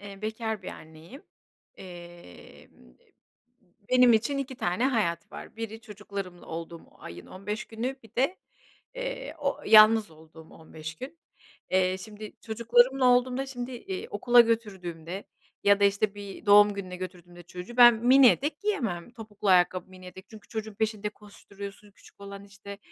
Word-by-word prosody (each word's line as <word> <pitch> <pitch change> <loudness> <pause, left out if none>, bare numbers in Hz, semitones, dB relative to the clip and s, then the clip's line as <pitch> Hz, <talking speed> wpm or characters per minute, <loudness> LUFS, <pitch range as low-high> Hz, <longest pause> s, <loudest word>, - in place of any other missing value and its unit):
eee, 200 0 -11
bekâr 220 -1 -4
bir - - -7
anneyim, 160 - -12 0.5
emm, - - -11
eee, 175 - -13 1.2
benim 250 -1 +6
için 230 +6 +1
2 265 -1 -5
tane 185 +4 0
hayat 205 -10 -1
var: - - -10
Biri 225 -1 -6
çocuklarımla 200 -5 -8
olduğum 165 0 -7 0.2
ayın 85 +1 -10
15 210 +3 -6
günü, 240 +4 -4
bir 225 - -19
de, 275 +10 +1 0.6
ııı, - - -5
o 280 -2 -2
yalnız 215 -1 +7
olduğum 160 0 -16
15 160 0 -10
gün. 275 - -10 0.5
Eee, 185 0 +2
şimdi 210 +2 -10
çocuklarımla 240 +4 +2
olduğumda, 250 +2 +2
şimdi, 250 -1 -6
iii, 195 -6 -6
okula 240 +4 +5
götürdüğümde 190 -6 -2 0.4
ya 200 0 +5
da, - - +4
işte, 200 +1 +1
bir 205 +1 -10
doğum 205 0 +7
gününe 185 -2 -6
götürdüğümde 180 -1 -9
çocuğu 180 +7 -10
ben 240 -1 +9
mini 250 +4 +6
etek 290 +5 0
giyemem, 240 - -2
topuklu 215 -3 -7
ayakkabı, 185 0 +3
mini 185 -1 -13
etek. 190 +2 -12
Çünkü 220 -2 -14
çocuğun 220 -1 -6
peşinde 215 0 -2
koşturuyorsun, 205 -1 -12
küçük 200 - -21
olan, 200 0 -9
işte, 200 0 -11
210 Hz, 150 wpm, -27 LUFS, 185-235 Hz, 1.2 s, ben